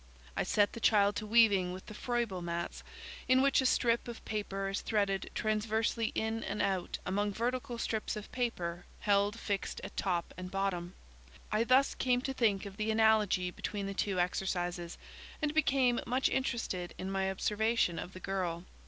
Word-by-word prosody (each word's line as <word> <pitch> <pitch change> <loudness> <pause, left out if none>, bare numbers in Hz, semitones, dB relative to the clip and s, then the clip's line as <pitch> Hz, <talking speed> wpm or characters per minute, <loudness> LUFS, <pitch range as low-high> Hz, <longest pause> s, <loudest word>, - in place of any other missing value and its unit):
I - - 0
set 205 -1 +2
the 230 - -6
child 205 -2 +4
to 215 - -4
weaving 205 -5 +4
with 185 - -8
the - - -9
Froebel 235 -5 -2
mats, 170 0 -4 0.4
in 255 0 +5
which 275 0 +4
a 260 - +3
strip 235 -1 +2
of 235 - -8
paper 195 -2 -2
is 195 0 -2
threaded 200 -3 0
transversely 220 +1 0
in 220 +1 -1
and 210 - -3
out 190 -2 0
among 205 +3 0
vertical 245 +1 -2
strips 225 -1 -2
of 210 -1 -7
paper 180 -9 -2 0.2
held 205 +2 +2
fixed 200 -3 -2
at - - -7
top 175 -3 -1
and 180 0 -6
bot 195 +1 0
tom. 175 0 -6 0.6
I 215 +2 +3
thus 260 +3 +4
came 250 -1 +1
to 270 +1 -2
think 215 -6 +1
of 200 -1 -8
the 215 +1 -1
analogy 215 -5 +3
between 200 +2 -4
the 195 - -3
two 195 -1 -1
exercises, 175 -1 -1 0.4
and 300 -2 0
became 275 -5 +3
much 255 +2 +2
interested 230 -9 -2
in 190 +1 -4
my 190 0 0
observation 210 -2 +1
of 185 - -7
the 185 - -8
girl. 180 -3 -2
210 Hz, 180 wpm, -32 LUFS, 190-230 Hz, 0.6 s, in